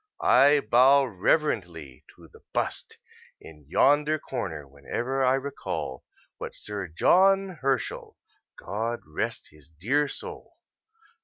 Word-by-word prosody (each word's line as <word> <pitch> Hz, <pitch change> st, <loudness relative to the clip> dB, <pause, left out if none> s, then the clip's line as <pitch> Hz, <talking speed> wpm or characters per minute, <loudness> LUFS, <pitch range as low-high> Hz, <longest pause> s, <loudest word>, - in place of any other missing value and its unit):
I 140 Hz, +3 st, +5 dB
bow 130 Hz, +5 st, +5 dB
reverently 90 Hz, -, -1 dB
to -, -, -16 dB
the -, -, -19 dB
bust -, -, -3 dB, 0.4 s
in 75 Hz, -2 st, -15 dB
yonder 150 Hz, -, +3 dB
corner 90 Hz, -, -6 dB
whenever 120 Hz, -, -3 dB
I 130 Hz, +1 st, +4 dB
recall 135 Hz, -, -5 dB, 0.3 s
what -, -, -7 dB
Sir 100 Hz, -3 st, -5 dB
John 190 Hz, -, +3 dB
Herschel 135 Hz, -2 st, -2 dB, 0.4 s
(God 115 Hz, +5 st, -4 dB
rest 75 Hz, 0 st, -4 dB
his 75 Hz, -1 st, -19 dB
dear 120 Hz, -, 0 dB
soul!) -, -, -10 dB
120 Hz, 110 wpm, -26 LUFS, -, 0.4 s, I